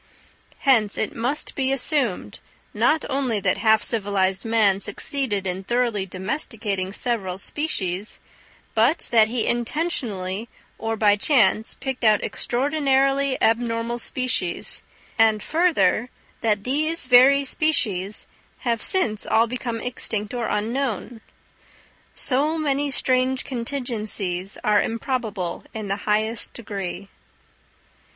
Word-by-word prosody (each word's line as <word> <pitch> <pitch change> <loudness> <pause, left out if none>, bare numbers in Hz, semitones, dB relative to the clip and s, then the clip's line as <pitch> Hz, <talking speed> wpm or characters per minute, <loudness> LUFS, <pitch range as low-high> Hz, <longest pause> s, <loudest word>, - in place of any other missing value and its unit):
Hence 225 -7 +3
it 215 - -2
must 250 +6 -1
be 265 -1 -1
assumed, 265 -5 -1 0.3
not 315 0 +2
only 260 -5 0
that - - +1
half 220 -1 +4
civilized 195 -4 0
man 215 -4 +3
succeeded 215 -3 -2
in 185 +1 -3
thoroughly 235 -3 0
domesticating 195 - -3
several 200 -5 -2
species, 200 - -2 0.5
but 240 +9 +2
that 225 -2 +5
he 230 0 -1
intentionally 235 - -1 0.3
or 225 0 -2
by 205 -1 +4
chance 220 -3 +2
picked 265 -2 -5
out 215 -2 +4
extraordinarily 275 0 +1
abnormal 230 +1 +1
species; 235 -9 0 0.4
and 220 -1 +4
further, 275 - +2 0.3
that 210 -3 +1
these 310 +6 0
very 260 +3 +6
species 215 - 0 0.4
have 235 -3 -1
since 225 - +1
all 225 +1 +4
become 235 -1 -4
extinct 220 -3 -2
or 240 -2 -2
unknown. 230 +1 -2 0.9
So 290 +5 +1
many 290 -2 0
strange 260 -1 +1
contingencies 215 -7 -2
are 210 -1 +4
improbable 225 -6 -3
in 215 -2 -5
the 195 - +1
highest 215 +1 +1
degree. 200 -3 -6
230 Hz, 110 wpm, -23 LUFS, 205-265 Hz, 0.9 s, very